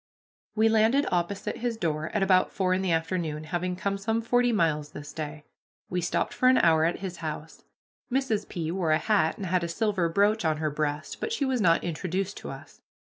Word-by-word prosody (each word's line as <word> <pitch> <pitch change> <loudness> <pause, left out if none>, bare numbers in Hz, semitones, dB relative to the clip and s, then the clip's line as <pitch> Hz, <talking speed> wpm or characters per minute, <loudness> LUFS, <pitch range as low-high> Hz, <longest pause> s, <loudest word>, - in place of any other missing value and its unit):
We 220 +1 +4
landed 225 +6 +3
opposite 180 +3 -1
his 235 -1 -2
door 155 -5 -1
at 210 - 0
about 185 -1 +3
four 185 -1 +1
in 185 - 0
the 190 -2 0
afternoon, 165 -2 -1
having 180 +2 -2
come 200 +2 -2
some 225 +3 0
forty 245 +1 +2
miles 155 -7 0
this 145 -1 -8
day. 150 -1 -6 0.5
We 180 0 0
stopped 175 - -1
for 255 - +3
an 255 - +5
hour 160 -1 +4
at 170 - -1
his 185 -3 -5
house. 155 -1 -7 0.5
Mrs. 245 -6 0
P. 165 -2 -3
wore 180 -2 -1
a 155 - +5
hat 180 -2 +1
and 200 - -5
had 180 0 +1
a - - -1
silver 190 -1 0
brooch 205 +5 +2
on 155 -2 +1
her 155 -1 -1
breast, 150 0 -3
but 450 - -2
she 300 -12 0
was 260 -3 0
not 165 -3 +4
introduced 185 +4 -2
to - - -7
us. - - -11
180 Hz, 210 wpm, -27 LUFS, 160-215 Hz, 0.5 s, an